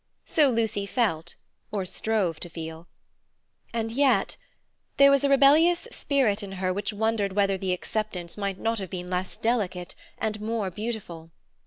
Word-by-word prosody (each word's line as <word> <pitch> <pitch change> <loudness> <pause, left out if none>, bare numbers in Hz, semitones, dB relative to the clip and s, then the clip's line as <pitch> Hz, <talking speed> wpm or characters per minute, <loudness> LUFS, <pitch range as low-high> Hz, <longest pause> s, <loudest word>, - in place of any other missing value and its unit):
So 300 -4 +4
Lucy 220 -4 0
felt, 170 -9 0 0.4
or 200 -3 -2
strove 190 -3 -1
to 175 - -7
feel. 160 0 -7 0.8
And 225 -1 -2
yet—there 275 +2 +1
was 275 0 +4
a 280 - +3
rebellious 310 - +5
spirit 250 - +1
in 195 -1 -7
her 185 -1 -1
which 205 +4 -2
wondered 210 -2 0
whether 200 -1 +2
the 190 -1 -2
acceptance 180 -2 -3
might 200 -2 -3
not 225 +1 -1
have 190 -2 -5
been 180 0 -6
less 180 +1 -2
delicate 190 -7 -1 0.2
and 215 -1 -2
more 215 -3 -2
beautiful. 195 -6 -5
205 Hz, 150 wpm, -26 LUFS, 185-230 Hz, 0.8 s, rebellious